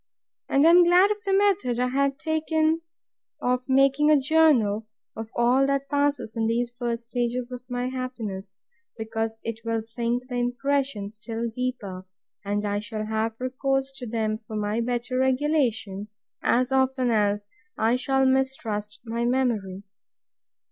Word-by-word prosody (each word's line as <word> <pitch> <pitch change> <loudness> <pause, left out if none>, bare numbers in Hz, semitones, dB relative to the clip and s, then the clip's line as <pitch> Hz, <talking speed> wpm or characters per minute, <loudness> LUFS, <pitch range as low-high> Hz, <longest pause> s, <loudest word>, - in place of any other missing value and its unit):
And 275 +2 +4
I 330 - +8
am 350 +1 +8
glad 360 +4 +5
of 420 - 0
the - - +2
method 395 -12 +2
I 250 0 +1
have 275 +1 +1
taken 315 +1 +1 0.6
of 250 +1 -1
making 275 +3 +4
a 300 -2 +6
Journal 260 -8 +3 0.3
of 225 0 -6
all 250 +3 +3
that 275 0 -1
passes 285 -5 0
in 225 -1 0
these 240 +1 0
first 235 -1 -3
stages 245 +1 -1
of 250 -1 -6
my 245 0 -2
happiness, 220 -7 -5 0.4
because 225 0 -3
it 225 -1 -4
will 230 -1 -1
sink 235 +2 -2
the 250 -1 -4
impression 245 -3 -1
still 230 +1 -4
deeper; 220 -6 -4 0.4
and 205 +1 -1
I 205 0 0
shall 215 0 -5
have 220 +1 -2
recourse 270 +1 -1
to 250 - -6
them 215 -1 -1
for 220 -1 -9
my 210 +2 -1
better 245 +1 -2
regulation, 260 -7 0 0.3
as 250 +2 +2
often 265 -2 +2
as 205 -1 +1 0.3
I 225 +2 +2
shall 270 +1 +1
mistrust 255 -6 -1
my 230 +1 -2
memory. 230 -7 0
245 Hz, 150 wpm, -25 LUFS, 220-270 Hz, 0.6 s, I